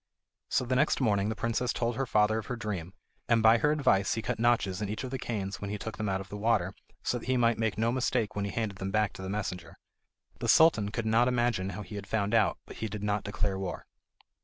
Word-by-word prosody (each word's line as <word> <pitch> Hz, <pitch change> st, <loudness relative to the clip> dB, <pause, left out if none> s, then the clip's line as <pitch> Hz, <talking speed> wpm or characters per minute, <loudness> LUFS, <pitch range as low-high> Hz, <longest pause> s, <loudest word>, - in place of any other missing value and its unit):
So, 125 Hz, -, +1 dB
the 130 Hz, +1 st, 0 dB
next 150 Hz, +4 st, +2 dB
morning, 105 Hz, -5 st, +2 dB
the 110 Hz, -, -2 dB
princess 115 Hz, +2 st, -1 dB
told 120 Hz, -1 st, -1 dB
her 135 Hz, +2 st, -1 dB
father 110 Hz, 0 st, +3 dB
of 110 Hz, -, -8 dB
her 125 Hz, -, -3 dB
dream, 100 Hz, -5 st, -5 dB, 0.3 s
and 115 Hz, -2 st, +4 dB
by 110 Hz, +1 st, +6 dB
her 150 Hz, -, +3 dB
advice 120 Hz, -10 st, +2 dB
he 115 Hz, -, -3 dB
cut -, -, -2 dB
notches 115 Hz, -5 st, +2 dB
in 105 Hz, -, -2 dB
each 110 Hz, +4 st, -4 dB
of 130 Hz, -, -5 dB
the 130 Hz, -, -3 dB
canes 100 Hz, -5 st, -4 dB
when 100 Hz, -, -4 dB
he 105 Hz, -, -3 dB
took 110 Hz, +2 st, -6 dB
them 105 Hz, -1 st, -2 dB
out 95 Hz, 0 st, 0 dB
of 95 Hz, -, -9 dB
the 105 Hz, -, -6 dB
water, 100 Hz, -4 st, +1 dB, 0.3 s
so 120 Hz, -, 0 dB
that -, -, -11 dB
he 130 Hz, 0 st, +2 dB
might 115 Hz, -1 st, +2 dB
make 110 Hz, -2 st, 0 dB
no 115 Hz, +2 st, +2 dB
mistake 120 Hz, -4 st, 0 dB
when 100 Hz, 0 st, -1 dB
he -, -, -3 dB
handed 100 Hz, -2 st, -3 dB
them 95 Hz, -, -3 dB
back 105 Hz, 0 st, +1 dB
to -, -, -9 dB
the 95 Hz, -, -5 dB
messenger. 90 Hz, -4 st, -4 dB, 0.6 s
The -, -, -2 dB
Sultan 135 Hz, -11 st, +5 dB
could 110 Hz, +2 st, -3 dB
not 115 Hz, +2 st, +4 dB
imagine 120 Hz, -6 st, +1 dB
how 105 Hz, -, -5 dB
he 105 Hz, -, -11 dB
had 100 Hz, -1 st, -7 dB
found 105 Hz, 0 st, -1 dB
out, 110 Hz, -4 st, +3 dB
but -, -, -11 dB
he 110 Hz, -, -3 dB
did 105 Hz, 0 st, -6 dB
not 105 Hz, 0 st, 0 dB
declare 100 Hz, -1 st, -1 dB
war. 95 Hz, -2 st, -5 dB
110 Hz, 260 wpm, -29 LUFS, 100-115 Hz, 0.6 s, by